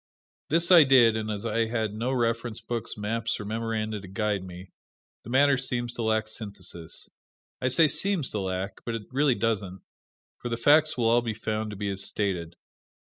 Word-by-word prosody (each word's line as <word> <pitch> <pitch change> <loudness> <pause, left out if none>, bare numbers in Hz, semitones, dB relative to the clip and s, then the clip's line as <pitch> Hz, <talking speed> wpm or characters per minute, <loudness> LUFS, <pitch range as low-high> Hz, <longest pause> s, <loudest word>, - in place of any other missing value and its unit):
This 165 +3 +3
I 170 -3 +10
did, 125 -5 +6
and 110 -1 -3
as 105 +1 -4
I 115 0 0
had 110 -2 -2
no 115 +4 -2
reference 115 -2 -1
books, 115 0 -5
maps 110 +2 -2
or 105 - -6
memoranda 110 -1 -3
to 95 - -11
guide 105 0 -1
me, 90 0 -10 0.5
the - - -10
matter 135 +2 +4
seems 120 -2 -2
to - - -5
lack 110 -1 +1
synthesis. 100 -6 -6 0.5
I 130 - +1
say 155 +5 +5
seems 180 -1 0
to 105 - -2
lack 95 0 -4
but 115 - -3
it 115 - -5
really 135 -1 +2
doesn't, 100 -6 -2 0.6
for 120 - -4
the 115 - -2
facts 155 +5 +4
will 120 - 0
all 120 +1 +4
be 115 -2 -3
found 110 0 -3
to 105 - -7
be 100 0 -2
as 100 0 -2
stated. 90 -6 -2
110 Hz, 195 wpm, -27 LUFS, 105-120 Hz, 0.6 s, I